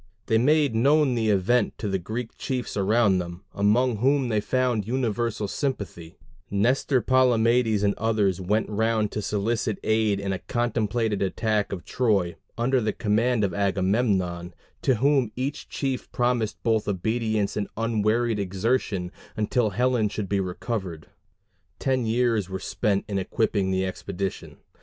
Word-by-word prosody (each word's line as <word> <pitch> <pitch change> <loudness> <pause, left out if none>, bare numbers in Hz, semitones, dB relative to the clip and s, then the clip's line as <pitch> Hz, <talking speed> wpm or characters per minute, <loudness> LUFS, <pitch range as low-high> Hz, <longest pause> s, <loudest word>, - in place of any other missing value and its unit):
They 110 0 +2
made 145 +1 +3
known 140 +4 +3
the 115 -2 0
event 105 +5 +2
to 110 - -4
the 95 -1 0
Greek 110 +6 -5
chiefs 125 -2 -3
around 100 -1 +3
them, 85 +1 -6
among 110 +4 +2
whom 135 +2 +2
they 110 -2 +1
found 125 -3 0
universal 115 -3 -1
sympathy; 100 - -4 0.3
Nestor, 125 +5 +1
Palamedes, 120 -4 +3
and 100 0 +3
others 105 -4 +1
went 105 +4 0
round 110 0 0
to 105 - -3
solicit 105 +1 -1
aid 110 -2 +2
in 100 -1 -2
a 95 - -3
contemplated 115 -3 -1
attack 105 +2 0
of 90 -3 -5
Troy, 100 -8 +1 0.2
under 125 +2 +2
the 110 -1 -1
command 115 +1 +1
of 95 -3 0
Agamemnon, 95 -3 0 0.3
to 130 - +3
whom 135 -1 +2
each 135 +3 -4
chief 135 -3 -3
promised 120 -3 0
both 110 -3 +1
obedience 110 +1 -1
and 105 -1 -2
unwearied 115 0 +1
exertion 95 -1 -1 0.3
until 110 +1 +1
Helen 120 +1 +1
should 105 -1 -4
be 100 +1 0
recovered. 95 -3 -4 0.7
Ten 130 -3 0
years 115 -4 +1
were 95 - -3
spent 100 +1 -1
in 100 -2 -1
equipping 100 0 0
the 95 0 0
expedition. 95 0 -5
110 Hz, 145 wpm, -25 LUFS, 100-120 Hz, 0.7 s, made